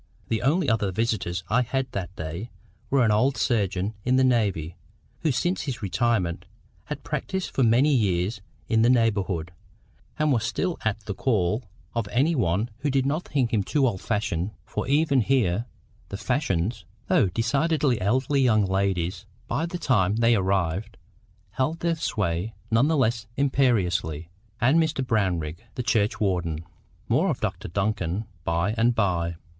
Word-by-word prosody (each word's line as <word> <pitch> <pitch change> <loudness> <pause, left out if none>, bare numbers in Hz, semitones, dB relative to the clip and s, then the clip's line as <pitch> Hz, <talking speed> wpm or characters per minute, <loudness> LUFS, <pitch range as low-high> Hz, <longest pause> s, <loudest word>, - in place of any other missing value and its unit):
The 110 - 0
only 150 +6 +2
other 110 -5 +1
visitors 95 -4 -1
I 120 +5 +3
had 130 +1 -2
that 95 -1 -5
day 85 +7 -5 0.4
were 135 -3 +3
an 110 - +3
old 125 +6 +2
surgeon 100 -3 0
in 125 +1 +2
the 130 - +4
navy, 100 -10 +1 0.4
who 160 - +1
since 175 +9 0
his 130 -6 -5
retirement 100 -3 0 0.4
had - - -6
practised 190 -1 -3
for - - -1
many 125 +5 +4
years 100 -3 +1 0.3
in 110 0 +3
the 115 - +5
neighbourhood, 100 -8 +1 0.7
and 155 -1 +2
was 115 -5 +2
still 175 +9 -1
at 110 0 -1
the 105 -1 -5
call 105 0 0 0.3
of 115 -3 -1
any 135 +10 +2
one 105 - 0
who 145 +2 -1
did 135 -1 +1
not 155 +5 -1
think 130 -4 0
him 105 - +3
too 140 +7 +1
old 105 -7 -1
fashioned—for 105 0 -3
even 140 -1 +3
here 115 -3 +1 0.4
the 100 - -5
fashions, 110 - -1 0.2
though 110 - +4
decidedly 135 - +1
elderly 130 +7 +1
young 110 -5 +4
ladies 95 -1 -1 0.2
by 165 +3 -1
the 180 - -4
time 105 - +2
they 115 +1 +4
arrived, 95 +1 -1 0.5
held 150 +6 -1
their 170 0 +2
sway 105 - -2 0.2
none 115 +5 +4
the 160 0 +2
less 115 -3 +1
imperiously—and 110 - +1
Mr 155 -4 -1
Brownrigg, 90 -9 0 0.2
the 125 - -2
churchwarden. 95 -8 0 0.4
More - - +2
of - - -1
Dr - - -3
Duncan 95 +1 -1 0.2
by 85 +6 0
and 120 +1 +2
by. 85 -6 0
110 Hz, 155 wpm, -25 LUFS, 95-130 Hz, 0.7 s, the